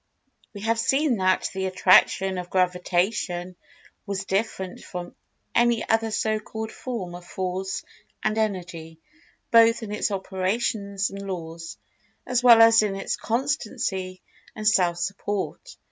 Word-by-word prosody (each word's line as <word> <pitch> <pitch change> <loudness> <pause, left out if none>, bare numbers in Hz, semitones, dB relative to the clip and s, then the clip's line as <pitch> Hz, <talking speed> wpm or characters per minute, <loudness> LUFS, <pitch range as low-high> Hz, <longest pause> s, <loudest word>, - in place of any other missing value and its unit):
We 200 - -7
have 225 +2 0
seen 270 +2 +2
that 185 -1 +1
the 190 0 -2
Attraction 190 0 +4
of 180 0 -7
Gravitation 180 0 0 0.5
was 195 -1 -3
different 190 -2 -2
from 175 -1 -7 0.4
any 235 -1 +2
other 225 0 +2
so 215 0 0
called 220 +1 -6
form 220 -9 -5
of 175 0 -9
Force 185 +1 -4 0.4
and 215 0 +1
Energy—both 215 - 0
in 210 - -6
its 210 - 0
operations 200 +1 -2
and 200 0 -7
laws, 165 -3 -6 0.5
as 250 -1 +1
well 235 -2 +8
as 225 0 +7
in 205 -2 -1
its 195 - -2
constancy 215 -7 -2 0.3
and 215 -1 -2
self 180 -5 +3
support. 200 - -4
195 Hz, 130 wpm, -25 LUFS, 185-225 Hz, 0.5 s, well